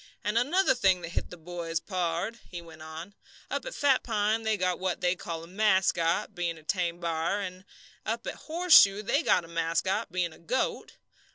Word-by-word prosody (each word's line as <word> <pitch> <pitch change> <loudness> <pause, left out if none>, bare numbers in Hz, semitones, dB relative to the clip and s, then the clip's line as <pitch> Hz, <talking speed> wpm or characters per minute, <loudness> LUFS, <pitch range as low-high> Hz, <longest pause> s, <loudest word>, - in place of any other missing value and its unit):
"And 210 +2 -1
another 280 +6 +3
thing 190 -7 +2
that 170 - -6
hit - - -3
the 180 - -10
boys, 165 -1 -4
pard," 185 +5 -2
he 175 - -6
went 165 -2 -13
on. 160 +5 -8 0.4
"Up - - -2
at - - -6
Fat 275 -3 +3
Pine 215 -1 0
they 220 -1 0
got 185 -1 0
what 185 -1 -1
they 180 0 +1
call 165 -2 -6
a - - -11
mascot, 190 -2 +2
bein' 175 -3 -2
a 155 - -15
tame 175 0 -1
b'ar; 170 +3 -1
an' 185 -1 -6 0.4
up 230 +2 -3
at - - -3 0.2
Horseshoe 315 - +6
they 280 +8 +1
got 180 - +2
a - - -13
mascot, 170 +6 -1
bein' 175 -2 -1
a - - -17
goat. 250 +10 -2
185 Hz, 195 wpm, -28 LUFS, 170-215 Hz, 0.4 s, Horseshoe